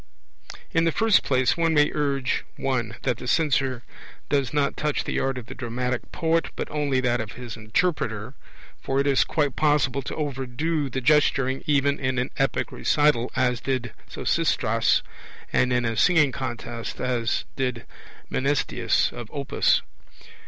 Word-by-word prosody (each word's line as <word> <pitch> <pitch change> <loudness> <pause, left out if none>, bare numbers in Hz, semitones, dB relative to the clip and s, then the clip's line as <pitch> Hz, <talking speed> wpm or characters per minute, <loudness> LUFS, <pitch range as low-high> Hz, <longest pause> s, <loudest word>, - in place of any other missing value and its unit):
In 165 0 +2
the 165 - +3
first 225 +4 +4
place, 130 -2 +2
one 165 -1 +1
may 150 0 +4
urge 140 -3 0
(1) 120 -4 -1
that 125 -4 0
the 125 - -8
censure 135 -5 +1 0.5
does 140 -4 +1
not 145 -2 +1
touch 150 -1 -1
the - - -2
art 135 -1 -1
of 125 - -6
the - - -8
dramatic 125 0 -3
poet, 165 0 +1
but - - -3
only 145 -3 0
that 120 -2 +1
of 110 -1 -7
his 125 -2 -7
interpreter; 110 - -1 0.5
for 135 0 0
it 140 - +2
is 140 -2 +4
quite 145 -4 0
possible 145 -3 +2
to - - -6
overdo 145 +1 -2
the 130 +1 -3
gesturing 135 -1 +2
even 140 -1 +2
in 130 -2 -1
an 125 +1 -1
epic 135 0 0
recital, 145 -5 +2
as 125 -2 +1
did 130 -2 -2 0.2
Sosistratus, - - +1 0.5
and 125 - +3
in 125 -1 +1
a 115 0 -1
singing 150 +3 +4
contest, 120 -3 -5
as 120 -2 -1
did 125 -3 -2 0.5
Mnasitheus 140 +2 +1
of 120 -2 -8
Opus. 140 -2 +1
135 Hz, 155 wpm, -25 LUFS, 125-145 Hz, 0.5 s, first